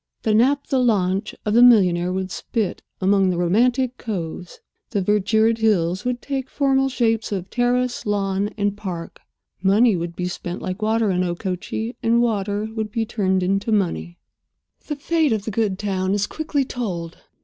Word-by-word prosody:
The 220 Hz, -, +2 dB
naphtha 265 Hz, +4 st, +2 dB
launch 200 Hz, -4 st, +1 dB
of 210 Hz, -, 0 dB
the 235 Hz, -, +6 dB
millionaire 180 Hz, -7 st, +5 dB
would 190 Hz, 0 st, -3 dB
spit 215 Hz, -2 st, -3 dB, 0.2 s
among 195 Hz, 0 st, +3 dB
the 180 Hz, -, -1 dB
romantic 240 Hz, +8 st, +1 dB
coves; 175 Hz, -5 st, -5 dB, 0.3 s
the 205 Hz, -, -1 dB
verdured 220 Hz, +3 st, +2 dB
hills 185 Hz, -4 st, +1 dB
would 245 Hz, -1 st, -2 dB
take 270 Hz, -2 st, -3 dB
formal 270 Hz, -1 st, +2 dB
shapes 225 Hz, -4 st, 0 dB
of 190 Hz, -2 st, -4 dB
terrace, 245 Hz, 0 st, 0 dB
lawn, 200 Hz, -1 st, 0 dB
and 205 Hz, -1 st, 0 dB
park. 180 Hz, -5 st, -6 dB, 0.4 s
Money 205 Hz, +3 st, +4 dB
would 170 Hz, 0 st, -4 dB
be 180 Hz, 0 st, -2 dB
spent 175 Hz, 0 st, -5 dB
like 185 Hz, +3 st, -5 dB
water 220 Hz, -1 st, +2 dB
in 180 Hz, 0 st, +1 dB
Okochee, 185 Hz, +6 st, -3 dB
and 230 Hz, 0 st, +3 dB
water 210 Hz, -2 st, 0 dB
would 220 Hz, -2 st, -3 dB
be 225 Hz, +1 st, -1 dB
turned 190 Hz, -4 st, 0 dB
into 195 Hz, +4 st, 0 dB
money. 85 Hz, -, -1 dB, 0.7 s
The 295 Hz, -, -2 dB
fate 310 Hz, -1 st, +1 dB
of 210 Hz, -2 st, -2 dB
the 220 Hz, -, -3 dB
good 205 Hz, -2 st, 0 dB
town 190 Hz, -1 st, -1 dB
is 205 Hz, 0 st, +1 dB
quickly 295 Hz, -1 st, -2 dB
told. 180 Hz, -10 st, -4 dB
210 Hz, 165 wpm, -22 LUFS, 185-235 Hz, 0.7 s, the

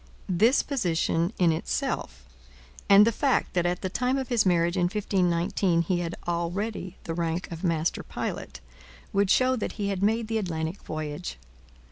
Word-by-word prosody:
This 220 Hz, +9 st, +4 dB
position 175 Hz, -, 0 dB
in 175 Hz, -2 st, +4 dB
itself, 65 Hz, -, -3 dB, 0.6 s
and 200 Hz, +1 st, +8 dB
the 230 Hz, -, +3 dB
fact 270 Hz, +3 st, +1 dB
that 175 Hz, -1 st, +1 dB
at 175 Hz, 0 st, -1 dB
the -, -, 0 dB
time 250 Hz, +7 st, 0 dB
of 265 Hz, -2 st, -3 dB
his 235 Hz, -5 st, +3 dB
marriage 170 Hz, 0 st, +2 dB
in 180 Hz, -2 st, +2 dB
1519 180 Hz, -2 st, +1 dB
he 175 Hz, +1 st, 0 dB
had 170 Hz, -1 st, -3 dB
already 180 Hz, +3 st, -2 dB
the 165 Hz, -, -4 dB
rank 170 Hz, +1 st, -2 dB
of 165 Hz, +1 st, -7 dB
master 165 Hz, -2 st, 0 dB
pilot, 65 Hz, -2 st, -5 dB, 0.5 s
would 200 Hz, -1 st, +2 dB
show 255 Hz, +4 st, +4 dB
that 225 Hz, -, -3 dB
he 205 Hz, -2 st, -2 dB
had 195 Hz, -2 st, -2 dB
made 220 Hz, +2 st, +1 dB
the 225 Hz, 0 st, 0 dB
Atlantic 165 Hz, -1 st, -3 dB
voyage. 150 Hz, -, -5 dB
180 Hz, 165 wpm, -27 LUFS, 170-210 Hz, 0.6 s, and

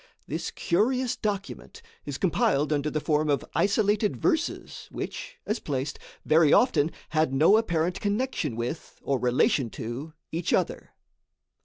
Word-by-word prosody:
This -, -, -3 dB
curious 250 Hz, +7 st, +1 dB
document 205 Hz, -, -4 dB, 0.2 s
is 145 Hz, -2 st, -4 dB
compiled 150 Hz, -4 st, +2 dB
under 145 Hz, +1 st, 0 dB
the 155 Hz, -, -1 dB
form 150 Hz, 0 st, +1 dB
of 140 Hz, -, +1 dB
isolated 205 Hz, +1 st, +2 dB
verses, 335 Hz, -2 st, -1 dB
which, -, -, -6 dB
as 215 Hz, +3 st, -1 dB
placed, 140 Hz, 0 st, -3 dB, 0.3 s
very 155 Hz, -1 st, +5 dB
often 160 Hz, -, +4 dB, 0.2 s
had 155 Hz, -3 st, +1 dB
no 160 Hz, +9 st, +6 dB
apparent 175 Hz, -5 st, 0 dB
connection 205 Hz, -, -1 dB
with, 120 Hz, +8 st, -5 dB
or 135 Hz, -2 st, 0 dB
relation 125 Hz, +1 st, +2 dB
to 130 Hz, +7 st, -5 dB, 0.2 s
each 165 Hz, +1 st, -1 dB
other. -, -, -1 dB
160 Hz, 135 wpm, -27 LUFS, 145-210 Hz, 0.3 s, no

